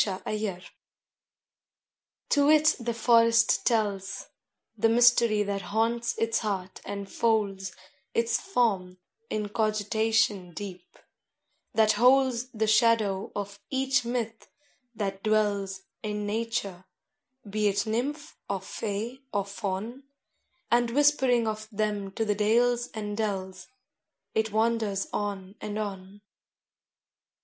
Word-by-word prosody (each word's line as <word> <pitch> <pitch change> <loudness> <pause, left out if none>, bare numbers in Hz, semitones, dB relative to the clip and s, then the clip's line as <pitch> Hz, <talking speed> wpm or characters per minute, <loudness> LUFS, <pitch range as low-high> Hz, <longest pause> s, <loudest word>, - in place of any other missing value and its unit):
THE 190 -3 -1
BROOK 205 -4 -3 1.7
To 285 0 +4
it 310 0 +5
the 235 0 -2
forest 230 0 +4
tells 205 -4 -1 0.5
The 225 +1 +2
mystery 235 -2 +5
that 200 -1 -2
haunts 230 +4 0
its 225 0 +1
heart 195 -4 -4
and 200 -1 -5
folds 200 -3 0 0.4
Its 230 0 +2
form 200 - 0 0.3
in 210 -1 -2
cogitation 215 -3 +1
deep, 185 -2 -8 0.8
that 220 -1 +5
holds 250 +2 +3
The 220 -3 -1
shadow 215 -3 +3
of 200 0 -5
each 265 -1 +1
myth 235 -2 -3 0.5
that 195 -2 -3
dwells 200 -3 0 0.2
In 210 -1 -3
nature 205 -4 -3 0.6
be 210 +1 0
it 200 +2 +1
Nymph 270 +7 -3
or 200 -1 -1
Fay 220 +5 -4
or 200 -1 0
Faun 200 +5 -4 0.7
And 240 0 +3
whispering 265 -3 +3
of 215 0 -3
them 210 -2 -1
to 225 - -1
the 210 - +2
dales 240 +4 +2
and 210 -1 -4
dells, 190 -3 -3 0.7
It 220 0 0
wanders 220 -3 +1
on 200 -2 -3
and 210 0 -4
on. 200 -1 -6
215 Hz, 115 wpm, -28 LUFS, 200-230 Hz, 1.7 s, it